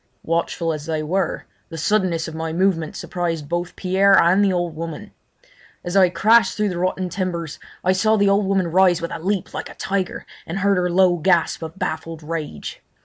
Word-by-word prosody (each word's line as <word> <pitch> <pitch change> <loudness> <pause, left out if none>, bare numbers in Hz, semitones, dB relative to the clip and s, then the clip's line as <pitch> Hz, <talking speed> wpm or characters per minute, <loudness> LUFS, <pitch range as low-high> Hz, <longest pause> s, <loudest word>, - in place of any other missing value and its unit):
Watchful 165 0 -1
as 155 0 -7
they 155 -1 -1
were, 180 +4 -1 0.2
the 165 - -7
suddenness 170 -2 0
of 160 - -7
my 160 0 -4
movement 170 -2 0
surprised 165 -4 -3
both 175 +2 -3
Pierre 195 +1 +3
and 185 +4 +4
the 195 - +3
old 175 -3 -2
woman. 165 0 -6 0.7
As 175 +2 -4
I 190 -2 +6
crashed 200 +3 +3
through 210 -1 +1
the 175 -2 -4
rotten 185 0 -1
timbers 175 -4 -4 0.2
I 185 - +3
saw 215 +4 +3
the 205 -1 +3
old 200 0 +2
woman 190 -3 +1
rise 180 -1 +4
with 170 - -5
a - - -5
leap 190 +3 -2
like - - -5
a - - -12
tiger 190 -1 -3 0.2
and 165 - -4
heard 200 0 +2
her 180 0 +1
low 180 0 +4
gasp 170 0 +1
of 160 +3 -7
baffled 165 -3 -4
rage. 155 - -6
175 Hz, 200 wpm, -21 LUFS, 165-190 Hz, 0.7 s, I